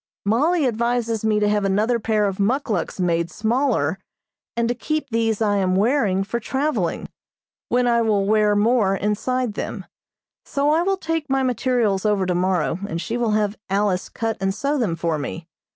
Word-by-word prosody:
Mollie 295 - +2
advises 235 -1 0
me 215 -1 +2
to 210 - +2
have 210 0 +1
another 210 +5 +1
pair 215 -1 +1
of 195 -1 -2
muckluks 210 - -1
made 170 -2 +1
smaller, 220 - 0 0.6
and 235 0 +1
to 240 - +1
keep 305 +4 -3
these 225 -1 +1
I 205 -1 +2
am 185 -1 +1
wearing 205 -3 +2
for 230 +4 -3
traveling, 275 +6 -1 0.6
when 245 +1 +2
I 235 -1 +3
will 210 -3 +1
wear 210 0 +3
more 210 -2 +3
inside 220 +4 -1
them, - - -5 0.6
so 285 +1 0
I 320 +2 +3
will 390 +2 +1
take 325 -4 -3
my 270 0 +1
materials 245 -6 +1
over 205 -3 +1
tomorrow 180 -1 0
and 165 - -3
she 225 +6 -3
will 235 -3 0
have 210 0 0
Alice 195 -2 0
cut 225 -1 -3
and 195 0 0
sew 280 +7 -1
them 200 -9 0
for 165 -2 -1
me. 160 +3 -6
215 Hz, 175 wpm, -22 LUFS, 195-245 Hz, 0.6 s, I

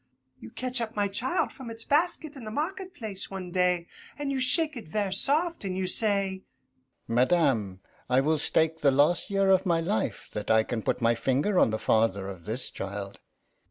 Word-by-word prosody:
You 110 - -11
catch 255 - -2
up 225 0 -4
my 205 -1 +1
child 245 - 0
from 260 -3 -10
its 225 0 -3
basket 310 0 0
in 265 - -10
the 215 - -6
market 365 - -4
place 210 - -1
one 185 -2 -7
day, 180 -1 +1 0.3
and 290 -1 -3
you 270 - -1
shake 300 +5 +4
it 235 - -8
ver' 200 +3 -2
soft, 305 - +3
an' 190 -2 -3
you 190 0 -2
say, 195 -1 +1 0.7
"Madame, 120 - +1 0.3
I 130 +1 +4
will 155 +2 +1
stake 160 +2 0
the 145 - +4
last 145 +6 +2
year 195 -1 +2
of 190 0 +4
my 170 -3 +1
life 180 +6 -2
that 105 -1 -5
I 110 0 +4
can 115 0 -4
put 120 - -2
my 115 0 +4
finger 140 - 0
on - - +4
the 110 - -2
father 110 -4 +1
of 90 -4 -10
this 120 +4 -5
child." 100 0 -6
185 Hz, 195 wpm, -27 LUFS, -, 0.7 s, shake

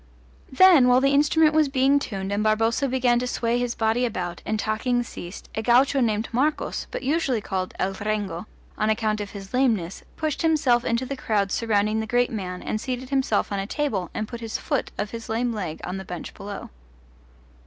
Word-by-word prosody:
Then, 315 -2 +7
while 250 0 +6
the 275 +1 +2
instrument 300 +2 +4
was 310 -2 +3
being 270 +1 +3
tuned 195 -7 -4
and 205 +1 0
Barboza 225 +5 +2
began 250 -2 +2
to 250 - -2
sway 235 0 0
his 245 -1 -2
body 225 +2 +1
about, 180 -7 -3
and 220 - 0
talking 240 +3 0
ceased, 180 -5 -9
a 220 - -2
gaucho 255 +4 +4
named 220 -2 +1
Marcos 285 +6 -1
but - - -5
usually 275 -3 +1
called 190 -3 -4
El 195 +1 -1
Rengo 205 -3 -3 0.3
on 215 0 +2
account 215 -1 0
of 205 - -5
his 195 -2 -10
lameness, 225 -9 +1
pushed 310 -3 -2
himself 285 -7 +3
into 235 +1 0
the 275 - -4
crowd 205 -6 0
surrounding 215 -1 +1
the 220 - -3
great 245 +2 +2
man 180 -5 -5
and 215 - -2
seated 255 +1 -4
himself 265 -8 +1
on 200 - -1
a 195 - -3
table 220 - -2
and 215 - -3
put 235 0 -8
his 225 -1 -3
foot - - -2
of 210 - -3
his 230 -1 -7
lame 235 +2 0
leg 180 -7 -4
on 180 +2 -4
the 190 - -6
bench 180 -2 -7
below. 200 0 -8
230 Hz, 200 wpm, -24 LUFS, 205-260 Hz, 0.3 s, Then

